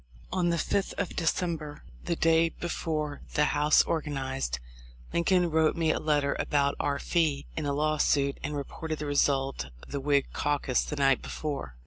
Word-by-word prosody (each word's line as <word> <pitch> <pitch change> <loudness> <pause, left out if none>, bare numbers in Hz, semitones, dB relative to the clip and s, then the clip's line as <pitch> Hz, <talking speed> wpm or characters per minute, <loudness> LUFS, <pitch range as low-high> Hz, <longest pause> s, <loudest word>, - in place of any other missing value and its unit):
On 180 -2 +2
the 170 - +1
5th 195 +4 0
of 200 - -3
December, 165 -3 -1 0.2
the 170 - 0
day 165 0 +4
before 155 -3 -3
the 150 - +4
House 150 +1 +5
organized, 135 - -2 0.6
Lincoln 175 0 +2
wrote 160 0 +3
me 165 -1 +2
a - - -1
letter 145 -2 +1
about 140 -1 +1
our 145 -1 0
fee 150 -2 0
in 155 -2 -2
a - - +1
law 155 +1 +1
suit 140 -1 +2
and 150 -1 -3
reported 155 +3 -4
the 150 - -4
result 135 - +1 0.2
of - - -13
the 140 - -2
Whig 140 0 +2
caucus 145 -3 +1
the - - -4
night 135 -2 +3
before. 140 - -5
150 Hz, 170 wpm, -28 LUFS, 140-165 Hz, 0.6 s, House